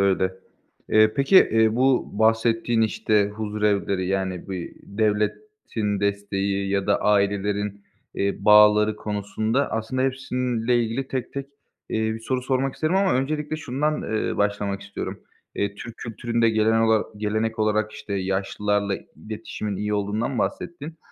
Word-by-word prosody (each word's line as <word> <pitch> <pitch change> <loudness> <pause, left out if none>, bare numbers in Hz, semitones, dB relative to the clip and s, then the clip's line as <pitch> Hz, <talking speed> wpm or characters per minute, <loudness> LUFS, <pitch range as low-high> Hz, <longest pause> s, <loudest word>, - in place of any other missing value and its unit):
öyle. 95 -1 +2 0.6
Eee, 110 0 +5
peki, 140 +8 +4
eee, 110 0 +3
bu 130 0 +2
bahsettiğin, 115 +1 +2
işte, 105 -1 +2
huzurevleri, 105 -3 -1
yani, 95 -1 -2
bir 90 -3 -5
devletin 105 - -2
desteği 100 -1 -1
ya 100 0 0
da 100 - +2
ailelerin, 100 0 +1 0.3
eee, 100 0 0
bağları 105 0 +6
konusunda 110 +5 -1
aslında 115 +4 -1
hepsiyle 125 -3 0
ilgili 125 +4 -3
tek 130 -2 -4
tek, 140 0 -4 0.4
eee, - - -1 0.2
bir 115 - -7
soru 125 +2 -2
sormak 130 0 0
isterim 155 +4 0
ama 195 -1 +3
öncelikle 150 +4 -1
şundan, 145 +1 -1
eee, 110 0 -2
başlamak 100 -1 0
istiyorum. 100 0 -6 0.3
Eee, 100 0 -1
Türk 115 +2 -9
kültüründe 115 0 0
gelen 110 +1 +3
ola 110 -1 +3
gelenek 110 +2 -1
olarak, 110 0 +1
işte, 100 - -8
yaşlılarla 100 +1 -1 0.2
iletişimin 105 +2 -5
iyi 105 +1 -1
olduğundan 105 +5 -1
bahsettin. 160 -1 -4
110 Hz, 135 wpm, -24 LUFS, 100-120 Hz, 0.6 s, bağları